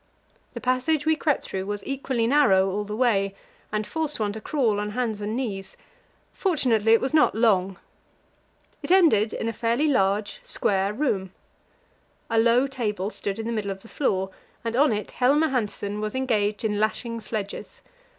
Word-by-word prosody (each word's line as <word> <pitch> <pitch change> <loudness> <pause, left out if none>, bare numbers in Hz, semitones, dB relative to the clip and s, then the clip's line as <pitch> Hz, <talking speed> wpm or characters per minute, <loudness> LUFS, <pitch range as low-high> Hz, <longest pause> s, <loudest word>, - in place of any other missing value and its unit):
The - - -4
passage 270 +4 +1
we 315 0 +3
crept 305 -2 0
through 190 0 -4
was 205 -1 -4
equally 265 -3 -1
narrow 200 -8 +4
all 205 +2 -2
the 210 +1 -5
way, 200 -5 +1 0.4
and 215 0 -1
forced 315 -1 -3
one 205 -2 -1
to 220 - -7
crawl 235 -9 0
on 210 0 -2
hands 220 -2 -2
and 210 +2 -3
knees; 200 -7 -4 0.6
fortunately, 245 - +2
it 230 - +5
was 265 +3 -2
not 310 -7 +4
long. 195 -5 +2 1.0
It - - -6
ended 310 - +5
in 225 - -3
a 230 - -1
fairly 235 +7 +1
large, 205 -6 +1
square 195 0 0
room. 210 -7 -1 1.0
A 225 - +3
low 235 +3 +4
table 215 -7 -3
stood 200 -2 -3
in 225 - -4
the 235 - -2
middle 210 -3 -2
of 195 0 -6
the - - -13
floor, 190 -8 -1 0.3
and 230 0 -2
on 285 +1 +4
it 210 -1 -3
Helmer 290 +5 +3
Hanssen 210 -4 -2
was 215 +2 -3
engaged 215 -5 0
in 210 -1 0
lashing 230 +2 -1
sledges. 210 -2 -6
220 Hz, 175 wpm, -25 LUFS, 205-260 Hz, 1.0 s, it